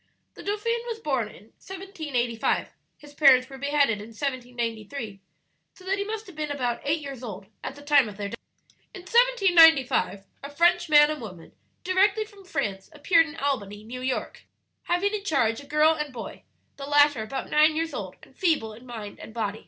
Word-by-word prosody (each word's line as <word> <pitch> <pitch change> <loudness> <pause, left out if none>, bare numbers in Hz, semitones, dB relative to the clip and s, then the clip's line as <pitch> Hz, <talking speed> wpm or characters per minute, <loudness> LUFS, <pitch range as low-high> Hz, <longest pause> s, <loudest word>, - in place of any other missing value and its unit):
"The - - -11
dauphin 445 +3 -1
was 460 -2 -3
born 270 - -1
in 210 - -14 0.2
1785, 310 - -2 0.3
his 290 -1 -15
parents 265 -4 +6
were 270 -1 -11
beheaded 280 -6 +1
in 210 - -9
1793; 240 -4 -4 0.6
so 370 - -17
that 390 +1 0
he - - 0
must 435 +1 -5
have 370 -5 -13
been 305 -1 -3
about 250 -4 -2
eight 305 +3 0
years 275 -4 -7
old 200 -5 -7 0.2
at 270 - -5
the 290 - -13
time 285 -5 +4
of 200 - -11
their 200 -1 -4
death. - - -8 0.6
"In 380 - -8
1795 355 - +4 0.2
a 280 - -6
French 340 +3 +2
man 295 0 +7
and 305 - -5
woman, 185 -7 -10 0.3
directly 390 +4 +2
from 410 -2 -17
France, 195 - -3
appeared 325 +2 +3
in 295 - -10
Albany, 210 -7 -3
New 250 +3 -8
York, 255 0 -3 0.4
having 385 +4 0
in 415 -2 -3
charge 235 - +1
a 285 - -15
girl 300 +2 +4
and 300 -2 -4
boy; 235 -3 -9 0.3
the 275 0 -7
latter 290 -4 +4
about 220 +5 -5
nine 310 +1 +5
years 325 +1 -2
old, - - -6
and - - -18
feeble 310 - 0
in 235 +4 -14
body 220 -4 -7
and 220 - -11
mind. 215 -2 -2
285 Hz, 190 wpm, -26 LUFS, 235-340 Hz, 0.6 s, man